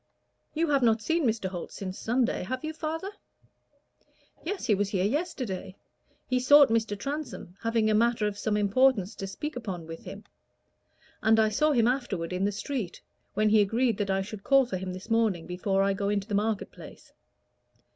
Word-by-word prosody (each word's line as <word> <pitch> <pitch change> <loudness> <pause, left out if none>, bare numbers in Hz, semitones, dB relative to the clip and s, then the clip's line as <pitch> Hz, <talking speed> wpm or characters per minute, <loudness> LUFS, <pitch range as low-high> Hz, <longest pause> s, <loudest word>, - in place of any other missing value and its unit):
"You 325 +1 +1
have 280 -2 +3
not 225 -2 +3
seen 330 -2 +1
Mr. 220 -3 -1
Holt 180 -2 -6
since 190 -1 -6
Sunday, 240 +1 0
have 255 +8 -4
you, 310 0 -3
father?" 325 +5 -4 1.3
"Yes, 385 +4 -3
he 215 - +3
was 200 0 0
here 190 -2 0
yesterday. 250 - -3 0.5
He 255 -1 +1
sought 285 +2 +7
Mr. 225 -2 0
Transome, 275 - -5
having 230 -1 +1
a 215 - +3
matter 230 0 +2
of 210 -1 -1
some 210 +1 -1
importance 210 0 +3
to 195 -1 -6
speak 300 +11 -5
upon 195 -9 -5
with 165 0 -9
him. 200 +2 -8 1.0
And 220 +1 +4
I 215 -1 +4
saw 300 +9 +2
him 235 -4 +3
afterward 200 -10 -1
in 185 +2 0
the 205 - +1
street, 210 -2 -4 0.4
when 215 +1 +3
he 215 0 +5
agreed 225 +2 +1
that 200 -1 -1
I 195 0 +1
should 205 0 -9
call 275 -1 +5
for 215 -6 -3
him 185 0 -5
this 185 +5 -9
morning 220 -7 +2
before 195 +2 0
I 195 0 +2
go 200 +1 -2
into 205 -1 -1
the 210 - -5
market 210 +1 0
place. - - -13
215 Hz, 190 wpm, -28 LUFS, 195-255 Hz, 1.3 s, sought